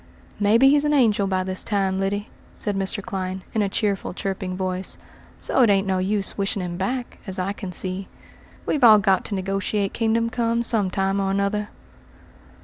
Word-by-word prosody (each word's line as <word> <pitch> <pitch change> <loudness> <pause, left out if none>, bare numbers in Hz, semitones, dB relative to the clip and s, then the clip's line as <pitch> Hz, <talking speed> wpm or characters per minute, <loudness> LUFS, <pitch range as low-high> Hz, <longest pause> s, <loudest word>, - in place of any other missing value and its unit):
"Maybe 225 +6 +5
he's 290 +1 +4
an 295 0 +2
angel 215 -7 +3
by 185 -1 0
this 185 0 -2
time, 195 -2 0
Lyddy," 205 +2 -1 0.3
said 205 -2 -2
Mr. 195 +2 -2
Clyne, 190 -3 -4
in 220 - +1
a 200 - +1
cheerful, 200 -3 -1
chirping 190 -2 -3
voice, 185 0 -3 0.4
"so - - +1
it 235 - +5
ain't 195 -1 +3
no 190 -1 0
use 200 +1 -1
wishing 195 -1 -1
him 175 -1 -4
back, 245 +7 -3
as 190 - -3
I 185 +2 -1
can 195 -2 -7
see. 185 +2 -3 0.6
We've 290 - 0
all 220 -3 +9
got 195 -2 +2
to 205 - -3
negotiate 195 +1 -1
kingdom 230 0 +1
come 230 +1 0
some 220 -5 +2
time 195 +1 0
or 195 -1 0
another." 200 +2 0
195 Hz, 185 wpm, -23 LUFS, 190-215 Hz, 0.6 s, all